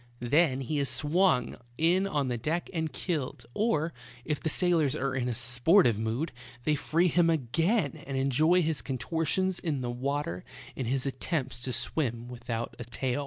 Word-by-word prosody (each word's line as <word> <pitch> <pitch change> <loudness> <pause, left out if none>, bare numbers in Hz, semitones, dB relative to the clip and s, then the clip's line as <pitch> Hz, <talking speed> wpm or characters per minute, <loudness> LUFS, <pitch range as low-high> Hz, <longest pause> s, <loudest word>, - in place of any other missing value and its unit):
Then 135 +2 +2
he 145 +3 -1
is 140 -2 0
swung 145 +1 +2 0.2
in 180 +4 +3
on 145 -7 0
the 125 - -1
deck 160 +8 -2
and 160 -2 -1
killed, 145 -9 -3
or, 165 -7 +1 0.3
if 150 -2 -1
the 160 - -1
sailors 160 -4 +2
are 135 -2 -1
in 125 -2 -1
a 120 - -2
sportive 120 - +4
mood, 115 +9 -2 0.3
they 155 - +2
free 165 +4 +2
him 175 0 +3
again 165 - +1
and 135 -1 -2
enjoy 155 +7 +3
his 160 -2 0
contortions 165 +7 -1
in 150 -6 -2
the 120 -1 -2
water 130 -7 -2 0.3
in 130 - -3
his 130 +2 0
attempts 135 -2 -2
to 130 - -2
swim 120 -3 -1
without 120 -1 -4
a - - -4
tail. 125 +3 -2
140 Hz, 170 wpm, -29 LUFS, 125-165 Hz, 0.3 s, sportive